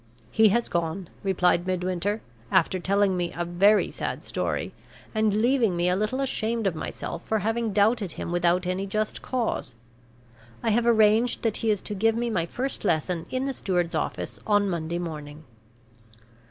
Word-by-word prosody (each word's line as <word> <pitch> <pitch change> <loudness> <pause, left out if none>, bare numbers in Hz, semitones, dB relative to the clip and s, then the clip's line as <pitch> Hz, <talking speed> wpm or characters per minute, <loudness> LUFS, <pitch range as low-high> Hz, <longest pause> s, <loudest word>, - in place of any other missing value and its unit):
"He 220 -1 +5
has 235 +4 +1
gone," 170 +1 -2
replied 180 -2 +2
Midwinter, 185 +3 -1 0.3
"after 185 0 +3
telling 195 +1 +2
me 175 -1 -1
a 175 - -2
very 195 +5 +3
sad - - -4
story, - - -2 0.4
and 215 -1 +2
leaving 240 -7 +2
me 175 +1 +2
a 180 - +2
little 215 +7 -1
ashamed 230 -4 -1
of 195 - +2
myself 165 +1 -5
for 220 - +1
having 225 +2 -1
doubted 205 -2 +2
him - - -5
without 175 +1 +2
any 185 +2 -2
just 215 +2 -2
cause. 235 - -2 0.9
I 225 - +2
have 235 +2 +2
arranged 220 +1 +4
that 225 -2 0
he 225 - -1
is 210 -3 +1
to - - -3
give 225 +3 +2
me 235 0 -1
my 170 -6 0
first 260 +8 -2
lesson 170 -2 0
in 260 +1 -1
the 275 - -1
steward's 180 -7 -1
office - - -3
on 205 -1 +3
Monday 170 -2 -2
morning." 155 -3 -6
200 Hz, 170 wpm, -26 LUFS, 175-220 Hz, 0.9 s, He